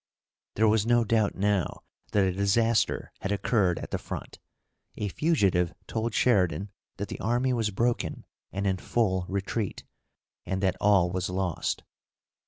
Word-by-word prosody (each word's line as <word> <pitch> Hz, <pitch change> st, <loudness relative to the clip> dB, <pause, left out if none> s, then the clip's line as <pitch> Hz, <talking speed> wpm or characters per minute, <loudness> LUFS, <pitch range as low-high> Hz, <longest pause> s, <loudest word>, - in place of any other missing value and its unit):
There 110 Hz, +1 st, +4 dB
was 110 Hz, -1 st, +3 dB
no 120 Hz, +1 st, +3 dB
doubt 110 Hz, -2 st, +1 dB
now 100 Hz, -2 st, 0 dB, 0.3 s
that 100 Hz, -, +3 dB
a 95 Hz, -, +2 dB
disaster 110 Hz, +4 st, +1 dB
had 100 Hz, -, -2 dB
occurred 100 Hz, -3 st, +2 dB
at -, -, -7 dB
the -, -, -1 dB
front. -, -, -7 dB, 0.6 s
A 105 Hz, -, -2 dB
fugitive 95 Hz, -, +2 dB
told 115 Hz, -1 st, -2 dB
Sheridan 100 Hz, -3 st, +2 dB, 0.3 s
that 100 Hz, -, -3 dB
the -, -, -6 dB
army 120 Hz, +4 st, +1 dB
was 115 Hz, -3 st, +1 dB
broken 115 Hz, +4 st, -1 dB, 0.3 s
and 100 Hz, +1 st, -3 dB
in 95 Hz, -1 st, +1 dB
full 95 Hz, -3 st, 0 dB
retreat, 100 Hz, +1 st, -2 dB, 0.6 s
and 95 Hz, +1 st, -2 dB
that 95 Hz, -1 st, +2 dB
all 100 Hz, -4 st, +4 dB
was 90 Hz, 0 st, -2 dB
lost. 90 Hz, -2 st, -2 dB
100 Hz, 150 wpm, -28 LUFS, 95-115 Hz, 0.6 s, There